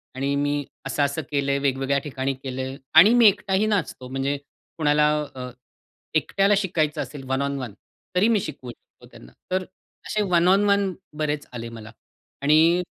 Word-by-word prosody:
आणि 140 +2 -1
मी 145 0 0 0.2
असं-असं 140 +3 0
केलंय, 140 -1 +1
वेगवेगळ्या 135 0 0
ठिकाणी 135 -2 -2
केलंय 130 0 -4 0.2
आणि 210 +7 +8
मी 240 -2 +7
एकटही 205 0 +2
नाचतो. 180 -11 -2
म्हणजे 135 +2 -1 0.4
कोणाला 150 -1 +3 0.3
अ, 125 -1 -6 0.7
एकट्याला 195 +5 +2
शिकायचं 160 -6 0
असेल 135 0 -7
वन 135 +1 0
ओन 140 0 -1
वन 120 -6 -6 0.4
तरी 185 +4 +4
मी 225 -2 +3
शिकवू 135 -7 -7
शकतो - - -20
त्यांना. - - -14 0.2
तर 185 0 +1 0.4
असे 215 - 0
वन 175 0 +4
ओन 195 +2 +5
वन 200 -1 +2 0.2
बरेच 150 -1 -2
आले 115 -1 -6
मला 115 -1 -10 0.5
आणि 160 +5 +4
145 Hz, 155 wpm, -24 LUFS, 135-180 Hz, 0.7 s, आणि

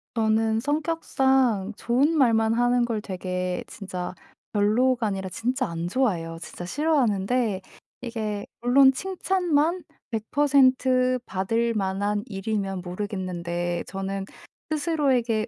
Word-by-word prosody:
저는 220 0 +2
성격상 265 - +1
좋은 260 +7 +2
말만 225 -4 +4
하는 245 +1 +3
걸 230 -2 -1
되게 180 -2 -3
진짜 185 -3 -6 0.4
별로가 225 +3 +2
아니라 195 -2 -3
진짜 255 +6 -1
안 170 0 -4
좋아해요. 175 -8 0
진짜 175 +1 -8
싫어하는데 235 - +1 0.4
이게 215 -4 -3
물론 265 +3 +6
칭찬만 355 0 0 0.3
100% 255 +1 +3
받을 225 +5 0
만한 205 +1 -1
일이면 195 -2 -3
모르겠는데 175 -2 -3
저는 195 0 -4 0.4
스스로에게 270 -8 +1
225 Hz, 240 characters per minute, -25 LUFS, 195-260 Hz, 0.4 s, 물론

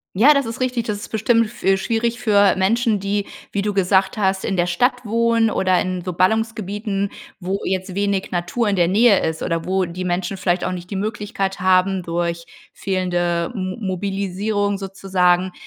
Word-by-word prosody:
Ja, 255 +10 +7
das 280 -2 +1
ist 230 +2 -6
richtig. 250 -2 -1
Das 210 -2 -1
ist 205 - -8
bestimmt 230 +1 +2
f 220 +3 -12
äh, 195 0 +4
schwierig 230 +4 -1
für 205 -4 +4
Menschen, 220 +3 +2
die, 200 +1 -2 0.3
wie 200 - 0
du 205 +1 -1
gesagt 190 +1 +2
hast, 190 -2 0
in 195 - -1
der 175 - +2
Stadt 245 +8 0
wohnen 230 +1 +2
oder 185 -3 +2
in 185 -1 -3
so 180 - -3
Ballungsgebieten, 205 +1 -1 0.3
wo 190 +1 -2
jetzt 185 0 -3
wenig 200 -1 0
Natur 175 +7 -1
in 205 - +1
der 175 -2 +2
Nähe 210 +1 +5
ist. 160 0 -2
Oder 165 -1 -1
wo 190 0 0
die 175 +2 -6
Menschen 180 +1 -2
vielleicht 180 -1 0
auch - - -2
nicht 180 0 -7
die 195 - -2
Möglichkeit 200 -2 -3
haben, 185 0 +3
durch 170 0 -2 0.3
fehlende 175 -3 -1
M 185 -2 -3
Mobilisierung 200 +1 -2
sozusagen, 185 -2 0
195 Hz, 185 wpm, -20 LUFS, 185-215 Hz, 0.3 s, Ja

